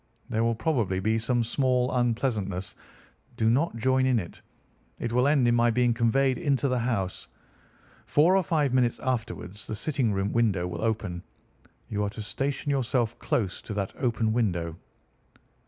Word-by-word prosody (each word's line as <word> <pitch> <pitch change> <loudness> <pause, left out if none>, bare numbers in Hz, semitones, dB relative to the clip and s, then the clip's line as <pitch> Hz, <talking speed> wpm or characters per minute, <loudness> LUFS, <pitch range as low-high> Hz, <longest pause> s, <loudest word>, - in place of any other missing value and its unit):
There 115 -1 0
will 115 0 +1
probably 110 - 0
be 110 +4 +1
some 120 +1 +1
small 125 +1 +1
unpleasantness. 115 -6 -1 0.6
Do 110 0 +3
not 145 +6 +1
join 130 +3 +2
in 130 -2 +3
it. 90 -6 -6 0.6
It 120 -1 -3
will 125 +2 +3
end 140 -4 +3
in 120 - +4
my 120 0 +4
being 120 0 +2
conveyed 130 +3 +2
into 140 -1 +1
the 125 -2 0
house. 115 -6 -2 0.8
Four 165 +6 +4
or 195 - +4
five 150 -6 0
minutes 125 -2 +2
afterwards 115 -5 -4
the 110 - -3
sitting 130 -1 0
room 100 +1 -1
window 105 -7 +2
will 85 -1 -5
open. 105 -6 -2 0.7
You 105 -1 -2
are 100 - 0
to 105 +1 -7
station 135 +7 -2
yourself 120 -3 0
close 95 -6 -1
to 105 - -6
that 100 -2 -2
open 115 -3 +1
window." 85 -8 0
115 Hz, 165 wpm, -27 LUFS, 105-130 Hz, 0.8 s, in